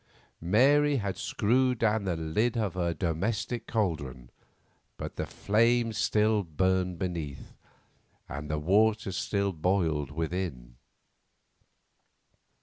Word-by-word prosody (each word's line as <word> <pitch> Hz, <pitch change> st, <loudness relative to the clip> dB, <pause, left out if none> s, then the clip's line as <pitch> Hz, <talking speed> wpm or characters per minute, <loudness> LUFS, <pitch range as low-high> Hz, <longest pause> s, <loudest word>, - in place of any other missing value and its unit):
Mary 140 Hz, -, +4 dB
had 100 Hz, -5 st, -2 dB
screwed 125 Hz, +3 st, +1 dB
down 110 Hz, -2 st, +1 dB
the 90 Hz, -3 st, 0 dB
lid 95 Hz, +10 st, 0 dB
of 105 Hz, -6 st, -1 dB
her 85 Hz, -2 st, -1 dB
domestic 100 Hz, +8 st, -2 dB
caldron, 70 Hz, -, -2 dB, 0.7 s
but -, -, -6 dB
the -, -, -3 dB
flame 115 Hz, +2 st, +2 dB
still 105 Hz, 0 st, +2 dB
burned 90 Hz, +1 st, 0 dB
beneath, 85 Hz, -6 st, -5 dB, 0.7 s
and 75 Hz, +3 st, -6 dB
the 75 Hz, -, -1 dB
water 105 Hz, +6 st, +2 dB
still 100 Hz, +1 st, -1 dB
boiled 80 Hz, -4 st, 0 dB
within. 80 Hz, -6 st, -4 dB
95 Hz, 105 wpm, -29 LUFS, 80-110 Hz, 0.7 s, Mary